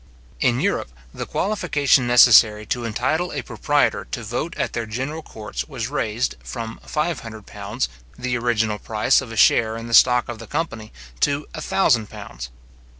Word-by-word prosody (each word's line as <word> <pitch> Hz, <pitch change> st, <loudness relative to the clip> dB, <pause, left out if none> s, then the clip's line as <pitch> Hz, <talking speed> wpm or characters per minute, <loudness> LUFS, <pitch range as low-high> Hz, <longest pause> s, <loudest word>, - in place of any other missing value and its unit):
In 125 Hz, -1 st, +2 dB
Europe, 180 Hz, -, -1 dB, 0.2 s
the -, -, -6 dB
qualification 150 Hz, -10 st, +1 dB
necessary 115 Hz, -3 st, +6 dB
to 120 Hz, +3 st, -2 dB
entitle 145 Hz, +10 st, -1 dB
a -, -, -4 dB
proprietor 145 Hz, -1 st, 0 dB
to 120 Hz, -, -5 dB
vote 125 Hz, -, -4 dB
at -, -, -2 dB
their 115 Hz, -1 st, -3 dB
general 135 Hz, +8 st, -4 dB
courts 110 Hz, -8 st, -6 dB
was 130 Hz, -5 st, -5 dB
raised, 115 Hz, -, -2 dB
from 115 Hz, -, -6 dB
five 155 Hz, 0 st, -2 dB
hundred 110 Hz, -3 st, -10 dB
pounds, -, -, -4 dB, 0.3 s
the 125 Hz, 0 st, -2 dB
original 110 Hz, -3 st, 0 dB
price 115 Hz, +5 st, +2 dB
of 125 Hz, -4 st, -9 dB
a 115 Hz, -, -7 dB
share 110 Hz, +1 st, +4 dB
in 115 Hz, -, -7 dB
the 115 Hz, -, -6 dB
stock 125 Hz, +1 st, +6 dB
of 120 Hz, -2 st, -6 dB
the 115 Hz, -, -10 dB
company, 115 Hz, -8 st, -4 dB, 0.3 s
to 145 Hz, -, +1 dB
a -, -, -6 dB
thousand 120 Hz, -, +2 dB
pounds. -, -, -9 dB
120 Hz, 170 wpm, -22 LUFS, 110-140 Hz, 0.3 s, necessary